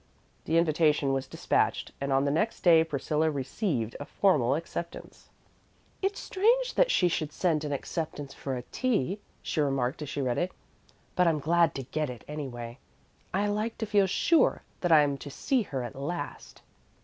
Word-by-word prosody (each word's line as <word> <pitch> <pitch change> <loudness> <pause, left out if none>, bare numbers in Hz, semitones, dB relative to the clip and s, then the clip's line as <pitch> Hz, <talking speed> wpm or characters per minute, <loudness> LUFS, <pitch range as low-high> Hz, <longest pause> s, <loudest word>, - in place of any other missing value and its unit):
The 165 - +2
invitation 155 -4 +3
was 135 0 -2
despatched, - - 0
and 140 0 -1
on 135 +1 +3
the 140 - +1
next 215 +10 0
day 165 -2 +6
Priscilla 155 +1 0
received 135 - -2
a 145 - -5
formal 140 -11 +2
acceptance. 170 +1 -7 0.7
"It's 395 +1 -1
strange 480 +6 +2
that - - +3
she 180 - +3
should 155 -3 -1
send 155 -2 0
an 150 - -3
acceptance 145 -1 -4
for 135 -2 -4
a 125 - -5
tea," 210 - 0 0.2
she 155 - -1
remarked 135 -1 0
as 150 - -5
she - - -4
read 125 -3 0
it, 180 +1 -1 0.6
"but 180 -1 +4
I'm 160 -2 +3
glad 165 +3 +2
to 135 - -4
get 150 +3 -2
it, 125 -2 -8
anyway. 125 -5 -6 0.5
I 200 +3 +1
like 210 +2 -1
to 225 - -2
feel 205 -2 +3
sure 325 - +3 0.2
that 175 - 0
I'm 145 -3 +5
to 145 - -8
see 255 - 0
her 135 - -4
at 120 - -7
last." 145 +3 -6
155 Hz, 175 wpm, -28 LUFS, 135-185 Hz, 0.7 s, day